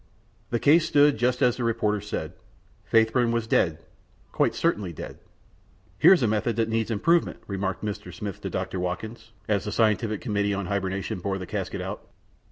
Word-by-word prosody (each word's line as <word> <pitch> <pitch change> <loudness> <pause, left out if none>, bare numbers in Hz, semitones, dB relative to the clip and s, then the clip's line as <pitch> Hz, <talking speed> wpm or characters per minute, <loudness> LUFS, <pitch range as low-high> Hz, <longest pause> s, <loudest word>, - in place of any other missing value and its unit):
The 120 - 0
case 155 +6 +4
stood 145 -4 +4
just 125 +2 +1
as 125 -2 +3
the 125 - -3
reporter 105 -3 0
said. 105 - -5 0.6
Faithburn 115 +2 +3
was 115 -1 0
dead, 80 -7 +1 0.5
quite - - +1
certainly 100 -4 0
dead! 80 - -9 0.8
"Here - - +8
is 180 -9 +5
a - - +3
method 110 +2 0
that 115 0 0
needs 110 0 0
improvement," 165 +11 +2
remarked 95 0 -3
Mr. 105 0 -5
Smith 105 -5 -6
to - - -4
Dr. 95 - -3
Wilkins, 110 +6 -5 0.2
as 105 -2 0
the 105 - -3
scientific 110 0 +1
committee 100 -3 -1
on 100 -1 -3
hibernation 95 0 -2
bore 95 +2 -2
the 95 - -6
casket - - -4
out. - - -5
110 Hz, 175 wpm, -26 LUFS, 100-120 Hz, 0.8 s, Here